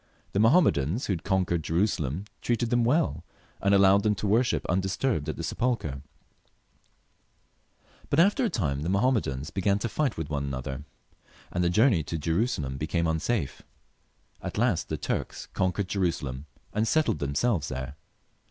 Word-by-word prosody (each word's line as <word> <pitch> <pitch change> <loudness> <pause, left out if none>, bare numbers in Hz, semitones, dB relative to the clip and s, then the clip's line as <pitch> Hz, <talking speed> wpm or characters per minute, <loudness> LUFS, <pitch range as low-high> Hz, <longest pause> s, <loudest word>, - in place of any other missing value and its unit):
The 100 - 0
Mahommedans 110 - +3
who 100 - 0
had 85 - -5
con 95 -2 +1
quered 85 -1 -1
Jerusalem 80 -2 0 0.2
treated 120 0 0
them 120 -1 +3
well, 115 - +1 0.4
and 100 - +2
allowed 100 0 +6
them 105 0 +2
to 105 - -4
worship 115 +5 +2
undisturbed 95 - 0
at - - -2
the 85 - -4
sepulchre; 85 - -1 2.1
but 140 - +2
after 205 +9 +4
a 235 - +2
time 75 - -1
the 80 - -2
Mahommedans 95 - +1
began 100 +1 +1
to 110 - -2
fight 135 0 -1
with 80 -2 -3
one 70 -1 -1
another, 70 +1 -5 0.7
and 90 - 0
the 85 - +3
journey 105 -1 +4
to 80 - -3
Jerusalem 80 - -1
became 85 +3 -1
unsafe. 80 - -1 0.8
At - - -5
last 115 -5 +1
the - - -2
Turks - - -3
conquered 95 +1 0
Jerusalem, 80 -8 -2 0.3
and 110 +2 +1
settled 155 - +2
themselves 75 - 0
there. 65 +1 -5
95 Hz, 155 wpm, -27 LUFS, 75-115 Hz, 2.1 s, allowed